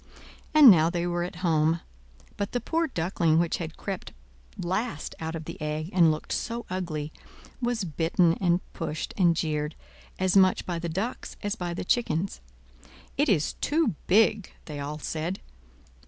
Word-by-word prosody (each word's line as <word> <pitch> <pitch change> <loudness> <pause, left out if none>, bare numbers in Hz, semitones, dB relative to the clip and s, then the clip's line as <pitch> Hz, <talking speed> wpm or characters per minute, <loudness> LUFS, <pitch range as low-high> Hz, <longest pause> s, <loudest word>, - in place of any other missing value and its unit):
And 300 -6 +10
now 165 -3 +5
they 170 0 -1
were 175 0 -1
at 180 +1 -5
home. 160 0 +2 0.5
But 200 0 -3
the 245 - +1
poor 330 +7 0
Duckling 165 - +1
which 170 0 +1
had 165 -2 -6
crept 195 -2 -5 0.4
last 185 -1 -2
out 160 0 -4
of 160 -1 -6
the - - -8
egg, 155 +3 -3
and 170 -3 +6
looked 155 0 -3
so 235 0 -2
ugly, 160 -5 -3 0.5
was 240 -3 0
bitten 165 +1 +2
and 175 -1 +3
pushed 160 -2 -4
and 175 -4 +4
jeered, 155 -1 -1 0.4
as 185 0 +1
much 190 -1 +5
by 175 -2 -2
the 170 0 -3
ducks 195 +9 -4
as 205 0 0
by 175 -4 -4
the - - -4
chickens. 195 -5 0 0.7
"It 290 0 +2
is 160 -7 +2
too 315 - +2
big!" 210 0 +3
they 150 -2 -6
all 145 +2 -4
said. 160 +5 -3
175 Hz, 165 wpm, -27 LUFS, 160-195 Hz, 0.7 s, And